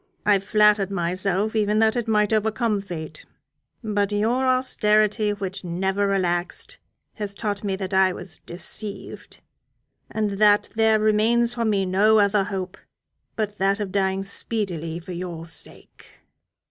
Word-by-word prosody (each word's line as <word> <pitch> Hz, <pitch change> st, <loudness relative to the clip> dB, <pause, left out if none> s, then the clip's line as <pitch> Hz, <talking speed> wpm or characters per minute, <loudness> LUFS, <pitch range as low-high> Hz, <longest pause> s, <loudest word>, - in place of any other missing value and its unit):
I 205 Hz, -1 st, +4 dB
flattered 210 Hz, 0 st, +3 dB
myself 190 Hz, +3 st, -1 dB
even 210 Hz, -1 st, +1 dB
that 220 Hz, +1 st, +3 dB
it 240 Hz, -1 st, -2 dB
might 210 Hz, -1 st, +2 dB
overcome 215 Hz, 0 st, 0 dB
fate; 160 Hz, -5 st, -8 dB, 0.6 s
but 205 Hz, -2 st, 0 dB
your 230 Hz, +6 st, +1 dB
austerity, 215 Hz, -4 st, +2 dB
which 195 Hz, -2 st, -5 dB
never 190 Hz, +3 st, -1 dB
relaxed, 180 Hz, -3 st, -1 dB, 0.4 s
has 205 Hz, -2 st, -3 dB
taught 205 Hz, -1 st, -3 dB
me 195 Hz, -2 st, -1 dB
that 190 Hz, 0 st, -5 dB
I 190 Hz, 0 st, +4 dB
was 180 Hz, -1 st, -7 dB
deceived, 200 Hz, +4 st, -7 dB, 0.7 s
and 215 Hz, -2 st, -1 dB
that 210 Hz, -1 st, +4 dB
there 220 Hz, -1 st, +3 dB
remains 225 Hz, +3 st, +3 dB
for 235 Hz, -1 st, -2 dB
me 200 Hz, -3 st, +1 dB
no 205 Hz, +4 st, +4 dB
other 200 Hz, -1 st, +3 dB
hope 190 Hz, -1 st, -5 dB, 0.6 s
but 210 Hz, -2 st, -3 dB
that 195 Hz, +2 st, +2 dB
of 205 Hz, -3 st, -3 dB
dying 190 Hz, -1 st, 0 dB
speedily 190 Hz, -5 st, -3 dB
for 175 Hz, +2 st, -10 dB
your 170 Hz, -2 st, -6 dB
sake." 165 Hz, -, -6 dB
205 Hz, 140 wpm, -23 LUFS, 190-215 Hz, 0.7 s, I